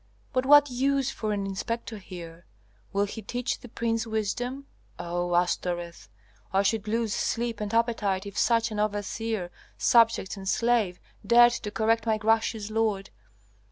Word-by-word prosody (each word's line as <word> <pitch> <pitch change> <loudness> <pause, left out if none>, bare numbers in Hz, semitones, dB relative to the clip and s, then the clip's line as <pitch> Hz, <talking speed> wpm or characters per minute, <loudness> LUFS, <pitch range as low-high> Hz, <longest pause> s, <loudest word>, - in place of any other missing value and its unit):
But 255 +1 0
what 290 -1 +7
use 270 +1 +1
for 215 -1 -3
an 200 -1 -1
inspector 215 +2 -4
here? 170 -3 -10 0.4
Will 200 +1 +1
he 215 +2 -7
teach 245 +4 -3
the 245 - -12
prince 230 0 -1
wisdom? 245 +5 -2 0.3
O 175 0 -2
Astoreth! 175 -3 -1 0.4
I 195 +1 +3
should 215 +1 0
lose 225 -1 0
sleep 230 -2 -2
and 210 -1 -3
appetite 220 -4 0
if 200 0 -8
such 230 -1 +2
an 210 - -3
overseer, 210 -2 -2 0.3
subject 230 -4 +3
and 190 -1 -4
slave, 230 -7 +1 0.2
dared 240 +3 +7
to 210 - -4
correct 225 +2 +1
my 220 -1 +2
gracious 220 0 0
lord. 215 -3 0
220 Hz, 150 wpm, -27 LUFS, 195-230 Hz, 0.4 s, what